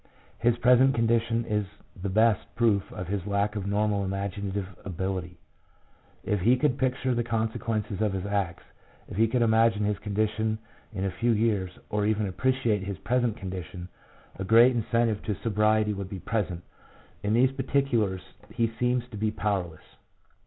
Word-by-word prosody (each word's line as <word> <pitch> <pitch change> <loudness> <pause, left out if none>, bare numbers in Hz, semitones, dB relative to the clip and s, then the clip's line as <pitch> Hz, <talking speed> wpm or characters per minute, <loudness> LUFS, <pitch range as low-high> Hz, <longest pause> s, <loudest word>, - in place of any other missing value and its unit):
His 120 0 +2
present 125 +2 +5
condition 115 0 +1
is 105 -3 -1 0.3
the 100 +2 -4
best 110 +2 +2
proof 110 -5 +2
of 90 -4 -6
his 100 0 -3
lack 100 +1 0
of 100 -2 -3
normal 100 0 +1
imaginative 100 0 -3 0.2
ability. 90 -1 -4 0.9
If 105 -3 0
he 120 +7 +4
could 135 0 +1
picture 130 0 0
the 120 0 0
consequences 110 -2 -2
of 105 -3 +1
his 95 0 -3
acts, 100 -4 -2 0.4
if - - -8
he 115 +1 +4
could 120 +1 +1
imagine 110 -2 +3
his 105 -1 -1
condition 110 +1 -1 0.3
in 100 -3 -3
a 95 - -1
few 115 +7 -1
years, 105 -5 0
or 105 0 +1
even 110 0 +1
appreciate 115 +1 0
his 100 -1 -4
present 120 +3 0
condition, 90 -2 -7 0.5
a - - -2
great 115 +5 +6
incentive 115 -1 +1
to 105 - -1
sobriety 105 +1 +2
would 100 -2 -5
be 100 - -5
present; 90 -5 -2 0.6
in 105 +2 +1
these 130 +2 +4
particulars 135 -8 0 0.3
he 115 -1 +1
seems 125 0 +1
to 110 - -8
be 110 +1 0
powerless. 95 -6 -2
105 Hz, 160 wpm, -27 LUFS, 100-115 Hz, 0.9 s, great